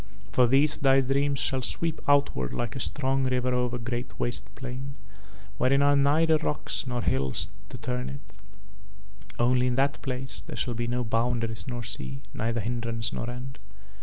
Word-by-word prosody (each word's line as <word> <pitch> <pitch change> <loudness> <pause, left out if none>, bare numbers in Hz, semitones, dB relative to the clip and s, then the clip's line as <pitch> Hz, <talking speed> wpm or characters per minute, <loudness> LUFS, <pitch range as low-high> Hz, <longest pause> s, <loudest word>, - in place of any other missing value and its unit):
For 125 +5 +5
these 140 +4 +4
thy 135 -1 +5
dreams 140 +2 +1
shall 135 -2 +1
sweep 165 +5 -1
outward 140 - +2
like 120 -2 -3
a - - -3
strong 135 0 0
river 125 0 +1
over 125 -1 +1
a - - -3
great 120 +1 -4
waste 120 -4 -1
plain 130 +1 -6 0.6
wherein 140 +2 +4
are 145 0 +5
neither 155 +3 +4
rocks 150 -3 -3
nor 120 -2 -1
hills 65 0 0 0.2
to - - -7
turn 125 +1 -3
it, 140 +2 -11 1.0
only 125 +1 +3
in 125 - +1
that 140 +2 +1
place 130 0 -1
there - - -8
shall 125 - -1
be 120 +1 -2
no 125 +1 0
boundaries 115 0 0
nor 120 -2 -3
sea, 70 - -6
neither 115 +1 -1
hindrance 115 0 -2
nor 120 - -3
end. 125 +2 -7
125 Hz, 170 wpm, -28 LUFS, 120-135 Hz, 1.0 s, For